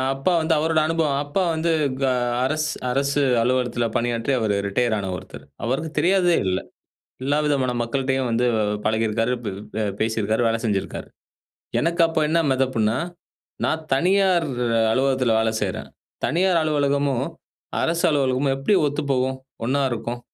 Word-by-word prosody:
அப்பா 155 Hz, +7 st, 0 dB
வந்து 160 Hz, +1 st, +1 dB
அவரோட 160 Hz, +1 st, +2 dB
அனுபவம். 160 Hz, -4 st, +1 dB
அப்பா 150 Hz, +7 st, 0 dB
வந்து 165 Hz, +1 st, 0 dB, 0.3 s
க -, -, 0 dB, 0.4 s
அரசு 155 Hz, +2 st, 0 dB, 0.2 s
அரசு 140 Hz, +2 st, +1 dB, 0.2 s
அலுவலகத்துல 125 Hz, -1 st, 0 dB
பணியாற்றி, 120 Hz, +2 st, 0 dB
அவரு 105 Hz, -2 st, +1 dB
ரிட்டயர் 115 Hz, +2 st, +1 dB
ஆன 95 Hz, -2 st, -3 dB
ஒருத்தர். 70 Hz, -6 st, -11 dB, 0.2 s
அவருக்கு 145 Hz, +6 st, -2 dB
தெரியாததே 180 Hz, -1 st, +3 dB
இல்ல. 95 Hz, 0 st, +1 dB, 0.6 s
எல்லா 145 Hz, +2 st, +1 dB
விதமான 135 Hz, -4 st, +1 dB
மக்கள்ட்டேயும் 130 Hz, +1 st, -1 dB
வந்து 120 Hz, +2 st, +1 dB, 0.4 s
பழகியிருக்காரு, 110 Hz, +2 st, +1 dB
ப் 105 Hz, -, -2 dB, 0.3 s
பே 110 Hz, -, -1 dB, 0.2 s
பேசியிருக்காரு, 110 Hz, 0 st, 0 dB
வேலை 115 Hz, 0 st, 0 dB
செஞ்சிருக்காரு. 100 Hz, -4 st, -2 dB, 0.7 s
எனக்கு 170 Hz, +1 st, +1 dB
அப்போ 165 Hz, -1 st, -1 dB
என்ன 165 Hz, +2 st, +2 dB
மெதப்புன்னா, 125 Hz, -4 st, +1 dB, 0.7 s
"நா -, -, +2 dB, 0.2 s
தனியார் 180 Hz, +2 st, +3 dB, 0.5 s
அலுவலகத்துல 130 Hz, -3 st, +2 dB
வேல 110 Hz, 0 st, +2 dB
செய்யறேன். 95 Hz, -3 st, -3 dB, 0.4 s
தனியார் 180 Hz, +1 st, +2 dB
அலுவலகமும், 140 Hz, -3 st, +1 dB, 0.6 s
அரசு 165 Hz, +1 st, 0 dB
அலுவலகமும் 135 Hz, -1 st, +1 dB
எப்படி 140 Hz, +10 st, +1 dB
ஒத்துப்போகும்? 130 Hz, -2 st, -1 dB, 0.3 s
ஒன்னா 140 Hz, +3 st, +1 dB
இருக்கும்? 120 Hz, +1 st, -4 dB
135 Hz, 135 wpm, -23 LUFS, 115-155 Hz, 0.7 s, தெரியாததே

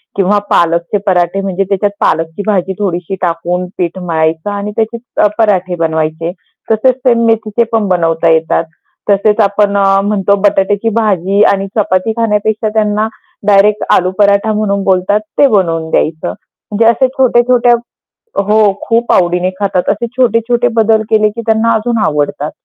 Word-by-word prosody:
किंवा 200 Hz, +1 st, +2 dB
पालकचे 170 Hz, +3 st, +1 dB
पराठे, 180 Hz, +1 st, +1 dB
म्हणजे 195 Hz, 0 st, -2 dB
त्याच्यात 200 Hz, +1 st, 0 dB
पालकची 165 Hz, +3 st, -1 dB
भाजी 190 Hz, -2 st, 0 dB
थोडीशी 185 Hz, -2 st, -3 dB
टाकून 175 Hz, +1 st, -2 dB
पीठ 175 Hz, 0 st, -2 dB
मळायचं 160 Hz, 0 st, -1 dB
आणि 205 Hz, +1 st, -4 dB
त्याचे 225 Hz, +1 st, -1 dB, 0.2 s
अ, -, -, +5 dB
पराठे 190 Hz, -5 st, +1 dB
बनवायचे. 160 Hz, 0 st, -2 dB, 0.4 s
तसेच 245 Hz, +4 st, +2 dB
सेम 235 Hz, -1 st, +3 dB
मेथीचे 225 Hz, 0 st, +1 dB
पण 220 Hz, -2 st, +1 dB
बनवता 165 Hz, -2 st, +1 dB
येतात. 160 Hz, +1 st, +1 dB, 0.5 s
तसेच 205 Hz, +2 st, +2 dB
आपण 200 Hz, 0 st, +1 dB
अ, 200 Hz, -, +2 dB, 0.2 s
म्हणतो 200 Hz, -1 st, +1 dB
बटाट्याची 205 Hz, +2 st, +1 dB
भाजी 200 Hz, -2 st, +1 dB
आणि 195 Hz, 0 st, -2 dB
चपाती 195 Hz, 0 st, 0 dB
खाण्यापेक्षा 215 Hz, -1 st, 0 dB
त्यांना 215 Hz, 0 st, 0 dB, 0.4 s
डायरेक्ट 205 Hz, +1 st, +3 dB
आलू 185 Hz, 0 st, +2 dB
पराठा 200 Hz, +1 st, +3 dB
म्हणून 200 Hz, -2 st, -1 dB
बोलतात, 190 Hz, +2 st, +1 dB, 0.2 s
ते 285 Hz, -, +5 dB
बनवून 165 Hz, -8 st, 0 dB
द्यायचं. 160 Hz, +1 st, -1 dB, 0.4 s
म्हणजे 215 Hz, +2 st, +1 dB
असे 235 Hz, +3 st, +3 dB
छोटे-छोटे 245 Hz, -1 st, +3 dB, 0.7 s
हो. 210 Hz, +1 st, +3 dB
खूप 230 Hz, +1 st, 0 dB
आवडीने 180 Hz, 0 st, +1 dB
खातात. 190 Hz, -3 st, -1 dB
असे 220 Hz, +4 st, -1 dB
छोटे-छोटे 240 Hz, 0 st, +1 dB
बदल 220 Hz, -1 st, +3 dB
केले, 215 Hz, -1 st, +3 dB
की 230 Hz, +2 st, -7 dB
त्यांना 220 Hz, +1 st, +2 dB
अजून 230 Hz, +2 st, -1 dB
आवडतात. 150 Hz, 0 st, -2 dB
200 Hz, 145 wpm, -12 LUFS, 180-220 Hz, 0.7 s, अ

